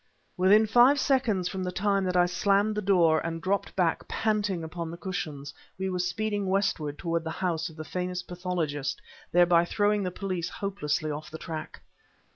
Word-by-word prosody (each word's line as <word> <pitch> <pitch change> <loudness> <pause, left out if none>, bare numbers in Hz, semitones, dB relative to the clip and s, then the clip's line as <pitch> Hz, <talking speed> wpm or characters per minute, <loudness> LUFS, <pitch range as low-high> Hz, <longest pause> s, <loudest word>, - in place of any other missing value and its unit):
Within 200 +4 +5
five 245 +6 +5
seconds 235 -11 +1
from 190 0 -4
the 180 - -2
time 195 +1 +1
that 180 0 0
I 175 - +5
slammed 200 +4 +2
the 210 - -2
door 175 -5 +4
and 165 0 -3
dropped 195 +3 -1
back 175 -3 0
panting 205 -5 0
upon 165 +1 -5
the 170 - -7
cushions, 155 -7 -5 0.2
we 190 0 -2
were 180 - -2
speeding 205 +3 -1
westward 185 -7 0
toward 170 -1 -1
the 160 - -4
house 165 -1 -2
of 160 - -14
the 155 - -6
famous 180 0 -3
pathologist, 175 -6 -3 0.3
thereby 175 -1 +5
throwing 205 +3 +1
the 185 - -1
police 180 -2 -3
hopelessly 155 -6 -2
off 150 +3 -6
the 160 - -7
track. 160 -1 -7
180 Hz, 180 wpm, -28 LUFS, 165-200 Hz, 0.3 s, Within